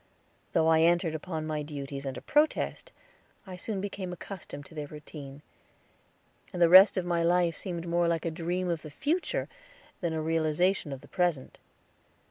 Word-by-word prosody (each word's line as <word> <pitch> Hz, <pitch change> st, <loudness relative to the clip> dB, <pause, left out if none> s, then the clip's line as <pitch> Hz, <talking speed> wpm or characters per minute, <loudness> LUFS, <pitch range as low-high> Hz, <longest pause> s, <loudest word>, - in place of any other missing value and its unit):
Though 160 Hz, -, +3 dB
I 160 Hz, 0 st, +5 dB
entered 170 Hz, 0 st, +3 dB
upon 160 Hz, 0 st, -4 dB
my 155 Hz, -1 st, -2 dB
duties 140 Hz, -2 st, -6 dB
under 135 Hz, -, -5 dB
protest, 310 Hz, -, +1 dB, 0.5 s
I 185 Hz, -2 st, -8 dB
soon 195 Hz, +2 st, -4 dB
became 190 Hz, -2 st, -4 dB
accustomed 175 Hz, -5 st, -8 dB
to -, -, -14 dB
their 150 Hz, -2 st, -5 dB
routine, 145 Hz, -1 st, -10 dB, 1.1 s
and 180 Hz, -, -5 dB
the 170 Hz, -1 st, +6 dB
rest 190 Hz, +3 st, +9 dB
of 185 Hz, -, 0 dB
my 170 Hz, -1 st, +1 dB
life 170 Hz, 0 st, +2 dB
seemed 175 Hz, -3 st, -5 dB
more 170 Hz, 0 st, +2 dB
like 165 Hz, -1 st, 0 dB
a 165 Hz, -, 0 dB
dream 175 Hz, +3 st, -2 dB
of 170 Hz, -3 st, -1 dB
the 155 Hz, -, -9 dB
future 300 Hz, -, -1 dB, 0.5 s
than 170 Hz, -3 st, -2 dB
a 160 Hz, -, -1 dB
realization 160 Hz, +2 st, +1 dB
of 135 Hz, -1 st, -6 dB
the -, -, -15 dB
present. 175 Hz, -7 st, -1 dB
170 Hz, 170 wpm, -29 LUFS, 155-180 Hz, 1.1 s, rest